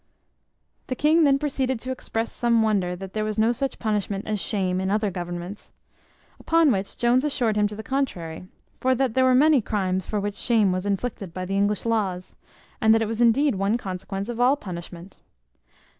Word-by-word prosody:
The 255 Hz, -, -2 dB
king 310 Hz, +4 st, +4 dB
then 275 Hz, -1 st, +4 dB
proceeded 265 Hz, -4 st, -1 dB
to 255 Hz, -, -4 dB
express 230 Hz, -3 st, -3 dB
some 235 Hz, -2 st, +2 dB
wonder 195 Hz, -5 st, 0 dB
that 190 Hz, +1 st, -9 dB
there 215 Hz, -, -1 dB
was 215 Hz, 0 st, -3 dB
no 220 Hz, +2 st, +3 dB
such 270 Hz, +3 st, -3 dB
punishment 205 Hz, -2 st, -2 dB
as 215 Hz, -1 st, -1 dB
shame 185 Hz, -4 st, -1 dB
in 190 Hz, -, -1 dB
other 210 Hz, 0 st, 0 dB
governments. 175 Hz, +2 st, -6 dB, 0.7 s
Upon 330 Hz, -3 st, +3 dB
which 195 Hz, -3 st, -2 dB
Jones 245 Hz, +2 st, +3 dB
assured 245 Hz, -7 st, 0 dB
him 210 Hz, 0 st, +3 dB
to 210 Hz, -, -8 dB
the 220 Hz, -, -7 dB
contrary; 180 Hz, -12 st, -3 dB, 0.3 s
for 260 Hz, 0 st, +2 dB
that 260 Hz, -2 st, 0 dB
there 260 Hz, +1 st, +3 dB
were 255 Hz, -1 st, +4 dB
many 295 Hz, 0 st, +5 dB
crimes 190 Hz, -4 st, -2 dB
for 210 Hz, -, -1 dB
which 205 Hz, 0 st, -2 dB
shame 215 Hz, -2 st, +2 dB
was 185 Hz, +2 st, -2 dB
inflicted 200 Hz, -3 st, -3 dB
by 185 Hz, 0 st, -3 dB
the 195 Hz, +2 st, -3 dB
English 205 Hz, +2 st, +1 dB
laws, 195 Hz, -6 st, -1 dB, 0.5 s
and 220 Hz, -1 st, +5 dB
that 225 Hz, -, +2 dB
it -, -, -2 dB
was 225 Hz, +2 st, -3 dB
indeed 265 Hz, +5 st, +4 dB
one 200 Hz, +3 st, 0 dB
consequence 195 Hz, -1 st, -5 dB
of 240 Hz, -1 st, -5 dB
all 250 Hz, +3 st, +4 dB
punishment. 175 Hz, -3 st, -9 dB
215 Hz, 195 wpm, -24 LUFS, 195-250 Hz, 0.7 s, many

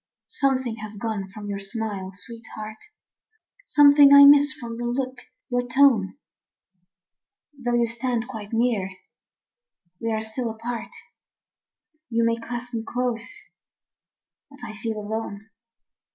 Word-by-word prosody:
Something 260 Hz, -4 st, -1 dB
has 215 Hz, -1 st, -8 dB
gone 205 Hz, -3 st, -3 dB
from 205 Hz, +1 st, -9 dB
your 200 Hz, -1 st, -3 dB
smile, 200 Hz, -2 st, -5 dB
sweetheart; 220 Hz, +1 st, -9 dB, 0.9 s
Something 285 Hz, -1 st, +7 dB
I 280 Hz, 0 st, +10 dB
miss 290 Hz, +1 st, +7 dB
from 235 Hz, -6 st, -7 dB
your 240 Hz, 0 st, -2 dB
look, 255 Hz, 0 st, -3 dB, 0.3 s
your 245 Hz, 0 st, -1 dB
tone. 250 Hz, -5 st, +3 dB, 1.4 s
Though 245 Hz, -3 st, -2 dB
you 240 Hz, 0 st, +3 dB
stand 235 Hz, 0 st, -2 dB
quite 220 Hz, -5 st, -8 dB
near, 225 Hz, -4 st, +1 dB, 1.1 s
we 230 Hz, 0 st, -2 dB
are 220 Hz, 0 st, -1 dB
still 220 Hz, +2 st, -3 dB
apart, 230 Hz, +1 st, -5 dB, 1.2 s
You 230 Hz, -1 st, +1 dB
may 230 Hz, 0 st, +2 dB
clasp 240 Hz, +1 st, -7 dB
me 225 Hz, -1 st, -2 dB
close, 240 Hz, -1 st, -3 dB, 1.2 s
but 280 Hz, 0 st, -15 dB
I 215 Hz, -, -7 dB
feel 220 Hz, 0 st, -4 dB
alone. 215 Hz, 0 st, -5 dB
230 Hz, 125 wpm, -24 LUFS, 220-250 Hz, 1.4 s, I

